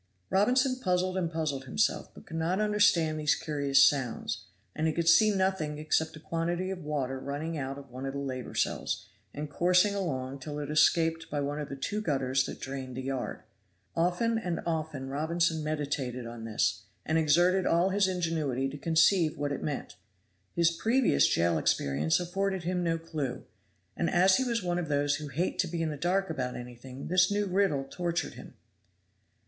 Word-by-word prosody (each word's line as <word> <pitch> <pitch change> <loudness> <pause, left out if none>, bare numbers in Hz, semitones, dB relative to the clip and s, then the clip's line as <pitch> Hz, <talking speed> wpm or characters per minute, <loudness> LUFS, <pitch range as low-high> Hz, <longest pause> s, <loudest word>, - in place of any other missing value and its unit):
Robinson 255 +6 +3
puzzled 185 -4 0
and 175 -3 -1
puzzled 150 -5 -2
himself, 210 - 0
but - - -13
could 165 - -6
not 170 +4 0
understand 205 -7 +3
these 150 -1 +3
curious 140 -2 +3
sounds, 125 -5 -2 0.3
and 155 +1 0
he 160 - +1
could 170 0 -1
see 215 +6 +7
nothing 190 -7 0
except 155 +1 0
a - - -10
quantity 170 +4 -2
of 180 -3 -6
water 135 -3 -2
running 145 +5 -4
out 135 -2 -4
of 140 -2 -12
one 130 +2 -5
of 135 - -4
the - - -4
labor 130 -3 -5
cells, - - -1 0.3
and 150 +5 -5
coursing 180 +5 +3
along 135 -9 -3
till 145 +2 -6
it 150 0 -4
escaped 165 +1 +3
by 145 - -2
one 145 +1 -2
of 150 - -5
the 140 - -5
two 205 +10 -3
gutters 135 -6 0
that - - -7
drained 130 -2 -6
the 130 - -4
yard. 135 -1 -4 0.5
Often 180 +7 +1
and 175 -6 -3
often 160 -5 -3
Robinson 160 +3 0
meditated 140 -5 -2
on 115 -1 -7
this, 105 -2 0 0.2
and 160 +1 +2
exerted 175 +5 +3
all 170 +3 +3
his 195 0 +2
ingenuity 160 -8 -1
to 145 +1 -8
conceive 165 +1 +3
what 145 0 -2
it 140 - -3
meant. 145 -3 -4 0.6
His 170 -1 +4
previous 220 - +3
jail 85 -1 +2
experience 75 +1 +1
afforded 190 +1 -2
him 180 +1 -1
no 165 -1 +1
clew, 155 -6 -4 0.5
and - - 0
as 185 +2 +5
he 260 - +1
was 235 -4 -1
one 175 0 0
of 170 - -3
those 145 0 +1
who 150 -1 -6
hate 155 +7 -2
to 180 - +2
be 165 0 -2
in 160 - 0
the - - -4
dark 180 +4 0
about 130 -5 -3
anything 125 +2 -9
this 180 0 +4
new 205 0 +1
riddle 185 -7 +1
tortured 170 +2 -2
him. - - -12
160 Hz, 185 wpm, -29 LUFS, 140-180 Hz, 0.6 s, see